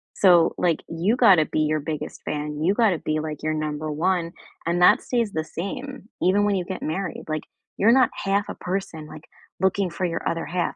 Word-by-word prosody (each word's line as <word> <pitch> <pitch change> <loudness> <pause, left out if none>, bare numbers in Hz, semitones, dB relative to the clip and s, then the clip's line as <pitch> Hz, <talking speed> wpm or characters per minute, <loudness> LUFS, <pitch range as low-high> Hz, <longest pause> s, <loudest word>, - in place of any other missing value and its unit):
So, 175 -4 +5
like, 170 -3 +1
you 175 +8 +1
gotta 190 -11 +6
be - - -2
your 155 0 +1
biggest 155 0 -5
fan, 150 0 -4
you 190 +4 +3
gotta 205 -7 +2
be, 155 0 -1
like, 155 -1 -5
your 155 0 0
number 155 0 -3
1, 170 +2 0 0.3
and 175 +1 0
that 210 +7 +6
stays 235 -5 -1
the 160 - -1
same, 210 - -6
even 200 +3 +3
when 205 -1 +2
you 180 - -1
get 190 -1 -6
married. 175 +2 -3
Like, 155 -1 -2 0.4
you're 220 +4 +5
not 255 -1 +5
half 200 +1 0
a - - -5
person, 180 -5 -4
like, 155 +1 -11 0.3
looking 190 0 +1
for 180 +2 -3
your 165 -1 -3
other 165 0 -2
half, 175 +1 -2
175 Hz, 205 wpm, -24 LUFS, 155-195 Hz, 0.4 s, gotta